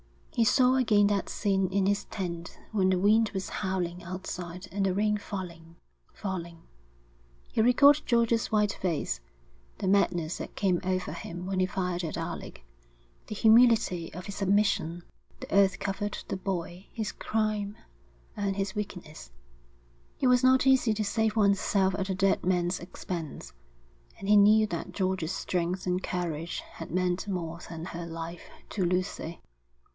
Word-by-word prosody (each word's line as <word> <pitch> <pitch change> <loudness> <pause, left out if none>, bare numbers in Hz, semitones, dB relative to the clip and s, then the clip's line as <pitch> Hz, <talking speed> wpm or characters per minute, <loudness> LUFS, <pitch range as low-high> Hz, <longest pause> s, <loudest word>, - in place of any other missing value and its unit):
He 230 - +3
saw 255 +2 +5
again 210 -5 +4
that 200 -1 0
scene 195 -2 +1
in 195 0 +2
his 200 +1 +1
tent 170 -4 -5
when 195 -4 +2
the 185 - +3
wind 215 +4 +4
was 190 -1 -3
howling 180 -3 -2
outside 180 0 -6
and 195 0 -1
the 190 - +1
rain 210 +1 +2
falling, 170 -5 -7 0.4
falling; 170 -4 -6 0.9
he - - +2
recalled 270 +5 +6
George's 235 -1 +2
white 210 -1 +2
face, 170 - -1 0.6
the - - -3
madness 175 -4 +2
that - - -7
came 185 -3 +1
over 185 0 -1
him 175 +1 -7
when 190 0 -1
he 185 - +3
fired 180 -1 -2
at 160 - -3
Alec, - - -6 0.6
the 215 - -5
humility 220 -6 +4
of 180 - -7
his 200 - -6
submission. 195 -4 +1 0.4
The - - -7
earth 195 -2 +4
covered 205 +1 -3
the - - -2
boy, 185 -1 -4
his 220 -3 -3
crime, 215 -2 -1 0.6
and 200 -1 -1
his 195 -1 -2
weakness. 180 - -6 0.9
It 260 - +2
was 250 0 +4
not 260 0 +5
easy 260 -4 +4
to 215 - -1
save 220 +1 0
one's 200 -3 +4
self 190 -2 +2
at 195 0 -3
a 190 - 0
dead 195 +1 +2
man's 180 0 +1
expense. 175 -3 -6 0.6
And 195 - -7
he 210 - +7
knew 215 +2 +6
that 180 -1 -5
George's 185 -3 -1
strength 180 0 -2
and 180 0 0
courage 170 -3 -3
had 165 - -10
meant 180 +2 0
more 170 -4 -3
than 165 -1 -6
her 170 -1 -6
life 165 +1 -7 0.2
to 195 - -1
Lucy. 180 -2 -2
190 Hz, 160 wpm, -29 LUFS, 175-210 Hz, 0.9 s, he